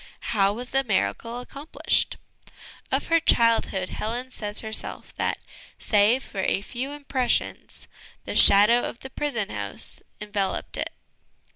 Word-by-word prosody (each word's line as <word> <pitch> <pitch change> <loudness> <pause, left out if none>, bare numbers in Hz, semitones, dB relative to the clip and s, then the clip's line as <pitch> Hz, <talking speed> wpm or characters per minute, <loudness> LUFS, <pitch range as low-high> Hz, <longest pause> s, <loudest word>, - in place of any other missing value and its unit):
How 200 -2 +3
was 245 +4 -5
the 270 0 +2
miracle 230 +2 -1
accomplished? 280 +5 -1 0.7
Of - - +1
her 330 0 +5
childhood 230 - +2
Helen 245 +4 -4
says 210 -3 -3
herself 220 -1 -5
that, - - 0 0.4
save 215 +5 +3
for 200 - -8
a 195 - 0
few 250 +5 -5
impressions, 280 -4 -2 0.4
"the - - -5
shadows 210 +5 +7
of 230 - -9
the 265 - -9
prison 235 -8 -2
house - - -6
" - - -41
enveloped 205 -2 -2
it. - - -2
230 Hz, 135 wpm, -25 LUFS, 205-260 Hz, 0.7 s, shadows